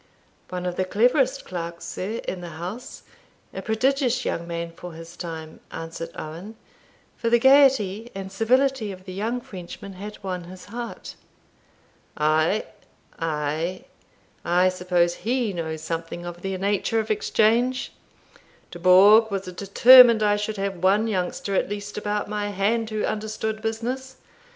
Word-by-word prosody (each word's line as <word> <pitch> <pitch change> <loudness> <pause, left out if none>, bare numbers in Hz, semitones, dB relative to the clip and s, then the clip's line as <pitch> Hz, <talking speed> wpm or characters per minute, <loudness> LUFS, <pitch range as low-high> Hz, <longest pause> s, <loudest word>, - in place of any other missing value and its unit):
"One 180 0 -4
of 180 -1 -3
the 185 - +2
cleverest 250 +7 +2
clerks, 170 -1 -6
sir, 190 +6 -4
in 185 - -3
the 175 - -7
house; 185 +9 -7 0.5
a - - -5
prodigious 255 +2 +1
young 170 0 -2
man 170 0 -4
for 175 0 -10
his 165 +1 -11
time," 160 -2 -7
answered 165 0 -6
Owen; 170 +8 -8 0.6
for 230 - -1
the 235 - +5
gaiety 245 -5 +4
and 195 0 -6
civility 245 +2 +1
of 185 -1 -11
the 185 - -7
young 225 +6 -2
Frenchman 195 0 -9
had 205 +3 -8
won 180 -2 -4
his 180 +1 -11
heart. 235 +3 -7 1.0
"Ay, 155 +6 +2 0.5
ay, 160 - -2 0.6
I 180 +2 +3
suppose 180 -1 +1
he 240 -2 -1
knows 160 -2 -4
something 165 +1 -5
of 175 0 -7
the 195 0 -3
nature 205 +3 0
of 220 0 -2
exchange. 235 +4 +1 0.8
Dubourg 190 +6 +6
was 195 -2 -2
determined 220 +5 +7
I 205 0 +3
should 210 +1 -3
have 195 -1 -2
one 195 +5 +3
youngster 195 -1 -2
at 190 - +1
least 205 0 -5
about 210 0 -2
my 210 0 -2
hand 215 +3 0
who 215 -1 -2
understood 215 0 -3
business. 245 +4 -3
200 Hz, 145 wpm, -24 LUFS, 175-225 Hz, 1.0 s, determined